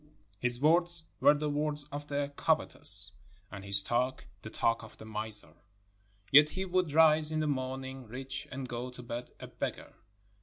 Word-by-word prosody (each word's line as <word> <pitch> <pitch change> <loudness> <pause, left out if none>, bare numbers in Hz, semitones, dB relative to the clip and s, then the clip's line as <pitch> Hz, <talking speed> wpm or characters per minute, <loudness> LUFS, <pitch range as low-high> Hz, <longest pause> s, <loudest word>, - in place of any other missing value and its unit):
His 125 -1 -2
words 170 +3 +3 0.2
were 145 - +6
the 150 +1 -2
words 150 0 -1
of 145 +1 -6
the 145 0 -3
covetous, 100 -5 +2 0.4
and 100 -1 -8
his 100 0 +5
talk 125 +4 -1 0.2
the 110 - -8
talk 115 +1 0
of 110 - -13
the - - -12
miser, 110 -1 0 0.8
yet 150 +2 +8
he 190 +4 -4
would 180 -3 0
rise 155 0 +5
in 155 - -1
the 155 - 0
morning 130 -2 -4
rich 130 +3 -6
and 130 -1 -6
go 120 +1 -5
to 125 0 -11
bed 120 +1 -6
a - - -8
beggar. - - -6
135 Hz, 175 wpm, -31 LUFS, 120-150 Hz, 0.8 s, yet